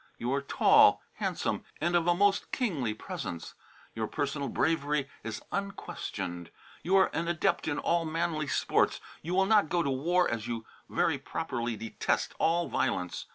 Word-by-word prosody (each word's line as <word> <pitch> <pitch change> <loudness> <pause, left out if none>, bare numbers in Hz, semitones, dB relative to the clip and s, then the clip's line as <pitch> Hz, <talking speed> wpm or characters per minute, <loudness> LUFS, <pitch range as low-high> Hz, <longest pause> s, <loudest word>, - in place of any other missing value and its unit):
You 120 +3 -1
are 140 - +1
tall, 140 - +5
handsome - - -1 0.2
and 175 +3 +1
of 170 0 +2
a 175 - +4
most 200 +2 +2
kingly 145 - -1
presence. 85 -5 -6 0.4
Your 110 -1 -2
personal 140 +2 -2
bravery 150 -3 +1 0.2
is 115 -2 -5
unquestioned, 95 - -4 0.3
you 185 +4 +1
are 190 -1 +5
an 165 +1 -1
adept 175 +2 +1
in 145 -2 0
all 170 0 +1
manly 160 -1 -1
sports, - - +2
but - - -18
you 180 - 0
will 190 0 +4
not 210 -6 +4
go 175 -1 +2
to 140 - 0
war 175 +7 +2
as 115 0 -3
you 115 -2 -4 0.2
very - - +1
properly 120 -1 -3
detest 110 +1 -1
all 170 +1 +2
violence. 90 -8 -1
155 Hz, 165 wpm, -30 LUFS, 120-175 Hz, 0.4 s, tall